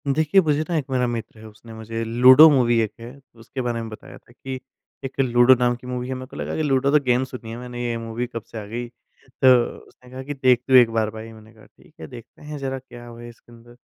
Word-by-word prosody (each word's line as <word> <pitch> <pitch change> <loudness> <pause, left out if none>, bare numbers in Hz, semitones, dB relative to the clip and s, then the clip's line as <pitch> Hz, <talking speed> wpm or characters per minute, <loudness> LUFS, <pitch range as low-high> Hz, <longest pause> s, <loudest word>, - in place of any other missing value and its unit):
देखिए 155 +6 +3
मुझे 150 -3 0
ना 170 - -1
एक 145 - -2
मेरा 125 -1 0
मित्र 115 -2 -6
है, 110 - -13
उसने 110 +2 -14
मुझे 115 +1 -6
लूडो 125 +7 +7
मूवी 125 -5 +2
एक 110 -2 -2
है 120 +4 -11 0.2
उसके 130 +3 -7
बारे 120 -2 -3
में 115 - -7
बताया 135 +5 -12
था - - -23
कि 130 +1 -8 0.5
एक 135 - -8
लूडो 120 0 +5
नाम 125 0 +1
की 125 +1 -13
मूवी 125 0 -4
है। 130 - -3
मेरे 130 0 -7
को - - -14
लगा - - -4
कि 155 - -1
लूडो 135 -1 +1
तो 150 - +5
गेम 125 0 +1
सुनी 125 -3 -9
है 115 - -7
मैंने 120 0 -7
ये 120 -1 -2
मूवी 115 +1 -5
कब 115 -2 -7
से - - -8
आ - - -9
गई? 120 +3 -6
तो 130 +2 -2 0.4
उसने 125 - -21
कहा 130 +1 -8
कि, 145 +2 -5
"देख 130 -3 +2
तू 135 - 0
एक 120 -2 +7
बार 110 -1 0
भाई।" 110 +1 -10
मैंने 110 0 -17
कहा, 110 -1 -19
"ठीक 180 - -24
है, - - -8
देखते 120 -3 -14
हैं, 150 0 -8
ज़रा 135 -1 -4
क्या 120 -2 -13
वो 115 - -12
है 120 0 -10
इसके 120 0 -19
अंदर।" 120 +1 -17
125 Hz, 270 wpm, -22 LUFS, 115-130 Hz, 0.5 s, लूडो